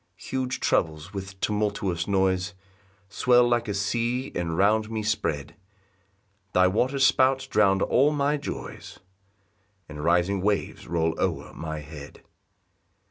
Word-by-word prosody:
2 -, -, -13 dB
Huge 130 Hz, -1 st, -1 dB
troubles, 80 Hz, +4 st, 0 dB
with 95 Hz, -1 st, -7 dB
tumultuous 100 Hz, -5 st, -1 dB
noise, 95 Hz, -2 st, +1 dB, 0.5 s
Swell 120 Hz, +4 st, +4 dB
like 120 Hz, -1 st, +1 dB
a 105 Hz, -, -2 dB
sea, 120 Hz, +6 st, -1 dB
and 85 Hz, -2 st, -2 dB
round 110 Hz, +3 st, +3 dB
me 110 Hz, -1 st, -3 dB
spread; 90 Hz, -9 st, -2 dB, 1.0 s
Thy 90 Hz, -, +5 dB
water 125 Hz, +9 st, +1 dB
spouts 135 Hz, 0 st, +3 dB
drown 100 Hz, -6 st, +3 dB
all 140 Hz, +4 st, +3 dB
my 145 Hz, 0 st, +1 dB
joys, 145 Hz, -, -7 dB, 0.9 s
And 75 Hz, -1 st, -8 dB
rising 90 Hz, +3 st, +2 dB
waves 100 Hz, +1 st, -1 dB
roll 80 Hz, -1 st, 0 dB
o'er -, -, -2 dB
my 80 Hz, -1 st, -5 dB
head. 75 Hz, -1 st, -11 dB
100 Hz, 130 wpm, -26 LUFS, 90-120 Hz, 1.0 s, Thy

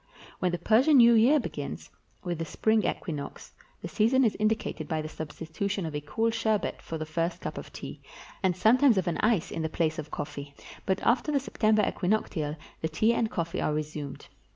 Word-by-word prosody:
Wlien 180 Hz, -, +2 dB
the 175 Hz, -, -1 dB
Persian 245 Hz, -, +4 dB
New 235 Hz, -1 st, +8 dB
Year 245 Hz, +7 st, +5 dB
begins, -, -, -6 dB, 0.3 s
with 175 Hz, -3 st, -3 dB
the 165 Hz, -, -2 dB
spring 220 Hz, +7 st, +1 dB
equinox, 150 Hz, -6 st, -4 dB, 0.3 s
the -, -, -3 dB
season 240 Hz, +5 st, +3 dB
is 220 Hz, -, +1 dB
indicated 215 Hz, -7 st, -1 dB
by 160 Hz, 0 st, -1 dB
the 155 Hz, -, -4 dB
substitution 165 Hz, +5 st, -4 dB
of 160 Hz, -, -5 dB
a 150 Hz, -, -2 dB
cool 225 Hz, +10 st, 0 dB
sherbet 220 Hz, -2 st, -1 dB
for 165 Hz, -, -5 dB
the 155 Hz, -, -4 dB
first 165 Hz, +2 st, -2 dB
cup -, -, -5 dB
of -, -, -8 dB
tea, -, -, -8 dB, 0.4 s
and 185 Hz, -3 st, +2 dB
sometimes 240 Hz, +3 st, +5 dB
of 185 Hz, -, +1 dB
an 170 Hz, -, -1 dB
ice 215 Hz, -6 st, +2 dB
in 165 Hz, -, -3 dB
the 160 Hz, -, -1 dB
place 160 Hz, -1 st, 0 dB
of 150 Hz, -1 st, -6 dB
coffee; 140 Hz, -1 st, -6 dB, 0.3 s
but 190 Hz, -1 st, +1 dB
after 255 Hz, +5 st, +2 dB
the 285 Hz, -, +2 dB
September 215 Hz, -5 st, +2 dB
equinoctial 180 Hz, -6 st, -1 dB, 0.3 s
the 160 Hz, -, -1 dB
tea 220 Hz, +9 st, +2 dB
and 230 Hz, -1 st, 0 dB
coffee 170 Hz, -2 st, -2 dB
are 150 Hz, -, 0 dB
resumed. 150 Hz, -2 st, -5 dB
185 Hz, 200 wpm, -28 LUFS, 155-220 Hz, 0.4 s, New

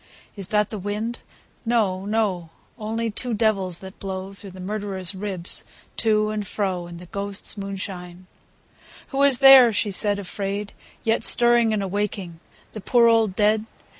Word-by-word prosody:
Is 195 Hz, -3 st, 0 dB
that 210 Hz, 0 st, 0 dB
the 215 Hz, -, -5 dB
wind? 210 Hz, +4 st, -4 dB, 0.4 s
No, 205 Hz, -5 st, 0 dB
no; 205 Hz, -6 st, -1 dB, 0.3 s
Only 225 Hz, +1 st, -3 dB
two 240 Hz, +2 st, -2 dB
devils, 195 Hz, -5 st, +1 dB
that 190 Hz, 0 st, -11 dB
blow 190 Hz, 0 st, -6 dB
Through 195 Hz, 0 st, -7 dB
the 185 Hz, 0 st, -12 dB
murderer's 195 Hz, -1 st, -3 dB
ribs 190 Hz, -3 st, -3 dB, 0.3 s
to 215 Hz, -1 st, +1 dB
and 210 Hz, -2 st, -4 dB
fro. 185 Hz, -4 st, -3 dB
In 175 Hz, 0 st, -10 dB
the 180 Hz, -, -11 dB
ghosts' 200 Hz, +2 st, -1 dB
moonshine. 190 Hz, -3 st, -7 dB
II. -, -, -36 dB, 0.3 s
Who 275 Hz, 0 st, -1 dB
is 280 Hz, -3 st, +5 dB
there, 270 Hz, -3 st, +8 dB
she 210 Hz, -1 st, -1 dB
said 205 Hz, +1 st, +1 dB
afraid, 200 Hz, +1 st, -5 dB, 0.3 s
yet 225 Hz, 0 st, +1 dB
Stirring 240 Hz, -1 st, +5 dB
and 210 Hz, -2 st, -1 dB
awaking 195 Hz, -3 st, -4 dB, 0.3 s
The 215 Hz, -, -8 dB
poor 240 Hz, +3 st, +3 dB
old 225 Hz, -4 st, +3 dB
dead? 215 Hz, +1 st, +2 dB
205 Hz, 160 wpm, -23 LUFS, 190-220 Hz, 0.4 s, there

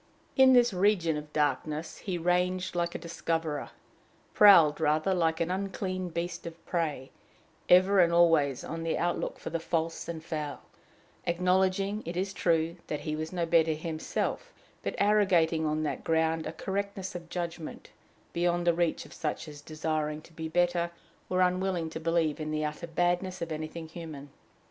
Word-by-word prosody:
In 265 Hz, -1 st, +7 dB
this 240 Hz, -3 st, +5 dB
region 180 Hz, -4 st, +2 dB
of 150 Hz, 0 st, -6 dB
darkness 150 Hz, +2 st, -1 dB
he 185 Hz, -3 st, -3 dB
ranged 180 Hz, +2 st, 0 dB
like 170 Hz, 0 st, -1 dB
a -, -, 0 dB
discoverer 165 Hz, -3 st, -3 dB, 0.6 s
prowled 170 Hz, -8 st, +7 dB
rather, 155 Hz, +5 st, +2 dB
like 165 Hz, -2 st, +1 dB
an 170 Hz, +1 st, 0 dB
unclean 185 Hz, -1 st, -3 dB
beast 170 Hz, +1 st, -4 dB
of 165 Hz, 0 st, -10 dB
prey 150 Hz, -6 st, -2 dB, 0.6 s
ever 185 Hz, +2 st, +6 dB
and 170 Hz, -2 st, +5 dB
always 165 Hz, -6 st, +4 dB
on 165 Hz, +1 st, -5 dB
the 165 Hz, 0 st, -1 dB
outlook 175 Hz, 0 st, -1 dB
for -, -, -7 dB
the 165 Hz, -, -1 dB
false 165 Hz, 0 st, -2 dB
and 160 Hz, -2 st, -5 dB
foul; 150 Hz, -4 st, -4 dB, 0.6 s
acknowledging, 185 Hz, +3 st, +1 dB
it 170 Hz, +2 st, -5 dB
is 190 Hz, +1 st, -1 dB
true, 165 Hz, -1 st, +1 dB
that 150 Hz, -, -3 dB
he 155 Hz, -1 st, -3 dB
was 155 Hz, +1 st, -4 dB
no 175 Hz, -2 st, -1 dB
better 165 Hz, -1 st, +3 dB
himself, 160 Hz, -, -3 dB, 0.3 s
but -, -, -3 dB
arrogating 180 Hz, -6 st, +3 dB
on 155 Hz, +1 st, 0 dB
that 150 Hz, -, -3 dB
ground 160 Hz, 0 st, +1 dB
a -, -, -3 dB
correctness 195 Hz, +1 st, -4 dB
of 170 Hz, -1 st, -8 dB
judgment 170 Hz, -2 st, -5 dB, 0.4 s
beyond 175 Hz, 0 st, +1 dB
the 170 Hz, -, +4 dB
reach 170 Hz, -1 st, 0 dB
of -, -, -13 dB
such 155 Hz, +1 st, -3 dB
as, 145 Hz, -1 st, -10 dB
desiring 155 Hz, 0 st, -2 dB
to 165 Hz, -, -18 dB
be 160 Hz, 0 st, -5 dB
better, 175 Hz, +1 st, +1 dB, 0.4 s
were 185 Hz, 0 st, +1 dB
unwilling 180 Hz, -2 st, +1 dB
to 160 Hz, -, -5 dB
believe 165 Hz, -2 st, +1 dB
in 155 Hz, 0 st, -3 dB
the 155 Hz, 0 st, -1 dB
utter 150 Hz, +3 st, -5 dB
badness 175 Hz, +2 st, 0 dB
of 170 Hz, -1 st, -4 dB
anything 155 Hz, +1 st, -5 dB
human. 155 Hz, -4 st, -9 dB
170 Hz, 170 wpm, -29 LUFS, 160-180 Hz, 0.6 s, In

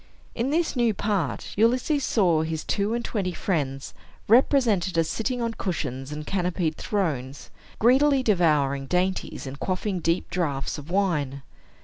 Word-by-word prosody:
In 235 Hz, +4 st, -1 dB
this 320 Hz, +2 st, 0 dB
new 235 Hz, -4 st, +2 dB
part, 190 Hz, -, -2 dB
Ulysses 255 Hz, +7 st, +2 dB
saw 175 Hz, -11 st, +2 dB
his 160 Hz, 0 st, -3 dB
two 210 Hz, +2 st, 0 dB
and 235 Hz, -, -3 dB
twenty 190 Hz, -5 st, -2 dB
friends 140 Hz, -8 st, -2 dB, 0.3 s
represented 220 Hz, -, +3 dB
as 165 Hz, -1 st, +3 dB
sitting 245 Hz, +5 st, -2 dB
on 230 Hz, -1 st, -1 dB
cushions 140 Hz, -, -4 dB
and 150 Hz, 0 st, -5 dB
canopied 180 Hz, -3 st, -1 dB
thrones, 150 Hz, -, -3 dB, 0.3 s
greedily 265 Hz, +3 st, +4 dB
devouring 150 Hz, -, +2 dB
dainties, 180 Hz, +1 st, -1 dB
and 135 Hz, +1 st, -7 dB
quaffing 185 Hz, 0 st, -2 dB
deep 165 Hz, +1 st, -1 dB
draughts 150 Hz, -5 st, -2 dB
of 145 Hz, +2 st, -11 dB
wine. 150 Hz, -8 st, 0 dB
180 Hz, 140 wpm, -25 LUFS, 150-225 Hz, 0.3 s, greedily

